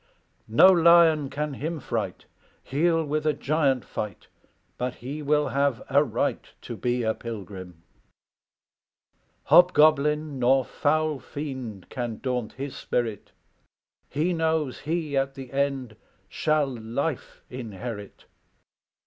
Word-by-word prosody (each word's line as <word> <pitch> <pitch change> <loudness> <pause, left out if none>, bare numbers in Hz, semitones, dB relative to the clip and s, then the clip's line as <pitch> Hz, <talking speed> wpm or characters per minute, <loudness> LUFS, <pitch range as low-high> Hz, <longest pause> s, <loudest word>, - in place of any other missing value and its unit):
No 110 +9 +6
lion 170 -4 +5
can 150 +1 -3
him 155 +4 -4
fright; 115 -8 -4 0.4
He'll 165 +3 +1
with 150 +1 -1
a 155 - +3
giant 140 -3 0
fight, 105 -4 -6 0.5
But 125 0 -2
he 140 +6 -6
will 150 -1 +1
have 140 -1 0
a 140 +2 +5
right 125 - -1 0.2
To - - -6
be 125 0 -1
a 110 0 +1
pilgrim. 95 -7 -8 1.6
"Hobgoblin 150 -4 +4
nor 130 +1 +3
foul 155 -1 0
fiend 130 - -7
Can 120 -3 -4
daunt 125 -4 -3
his 135 +1 -6
spirit; 115 -4 -3 0.8
He 160 +6 0
knows 160 -4 0
he 155 -2 -2
at 135 0 0
the 130 -2 -9
end 135 -4 -1 0.3
Shall 155 +7 +1
life 125 +3 -4
inherit. 115 -3 -7
135 Hz, 115 wpm, -26 LUFS, 120-150 Hz, 1.6 s, No